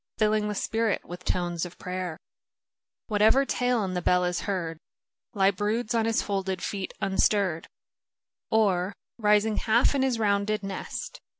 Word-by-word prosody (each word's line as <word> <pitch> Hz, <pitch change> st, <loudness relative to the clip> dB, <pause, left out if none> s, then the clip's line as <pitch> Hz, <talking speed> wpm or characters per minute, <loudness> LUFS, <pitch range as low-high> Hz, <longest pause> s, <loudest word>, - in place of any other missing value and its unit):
Filling 215 Hz, -1 st, +2 dB
the 210 Hz, -, -3 dB
spirit 225 Hz, 0 st, 0 dB
with 175 Hz, +1 st, -9 dB
tones 175 Hz, -2 st, -1 dB
of 175 Hz, -1 st, -7 dB
prayer 180 Hz, -3 st, -4 dB, 0.9 s
Whatever 220 Hz, +5 st, +4 dB
tale 245 Hz, -3 st, +1 dB
in 185 Hz, -1 st, -3 dB
the 180 Hz, -, -1 dB
bell 180 Hz, +1 st, +3 dB
is 180 Hz, -1 st, -1 dB
heard, 165 Hz, -5 st, -2 dB, 0.6 s
lie 195 Hz, -1 st, +4 dB
broods 215 Hz, +4 st, -1 dB
on 225 Hz, -1 st, +2 dB
his 225 Hz, 0 st, +1 dB
folded 190 Hz, -3 st, -2 dB
feet 195 Hz, -2 st, -3 dB
unstirr'd, 190 Hz, -3 st, +1 dB, 0.8 s
Oi, 195 Hz, -4 st, +2 dB, 0.3 s
rising 210 Hz, 0 st, +3 dB
half 235 Hz, +5 st, +3 dB
in 275 Hz, -, +1 dB
his 260 Hz, -3 st, +1 dB
rounded 210 Hz, -1 st, +1 dB
nest. 195 Hz, 0 st, -6 dB
200 Hz, 145 wpm, -27 LUFS, 185-220 Hz, 0.9 s, Whatever